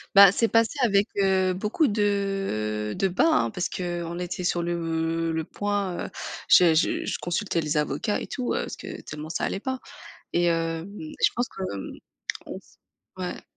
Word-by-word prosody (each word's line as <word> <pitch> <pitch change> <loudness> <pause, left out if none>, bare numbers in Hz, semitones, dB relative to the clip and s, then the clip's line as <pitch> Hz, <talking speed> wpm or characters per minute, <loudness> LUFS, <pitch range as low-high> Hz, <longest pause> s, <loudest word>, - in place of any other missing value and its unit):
Bah 200 -2 +10
c'est 230 +2 +2
passé 230 +5 +2
avec, 205 -1 +4
heu, 190 -1 +3
beaucoup 210 - +1
de 195 - 0
de 195 - +2
bas 250 - +3
hein 115 -1 +2
parce 180 - -2
qu'on 175 -1 -3
était 180 0 -4
sur 175 -1 +1
le 165 -1 -1
le 160 0 -1
point, 205 -1 -2
heu, - - -10 0.4
j'ai 170 -3 +7
je 160 - +1
consultais 175 -1 -1
les 150 0 -1
avocats 150 - 0
et - - -5
tout, 255 -3 -2
heu, - - 0
parce - - -6
que - - -8
tellement 150 +1 -7
ça 165 - -1
allait 195 - -2
pas, 260 +2 -3 0.5
et- 175 0 +3
hem, 165 0 0
et 155 - -7
je - - +6
pense 245 +1 0
que - - -9
hem, 95 - -6 0.6
on - - -6
se - - -25 0.5
ouais. - - -5
180 Hz, 185 wpm, -26 LUFS, 165-200 Hz, 0.6 s, Bah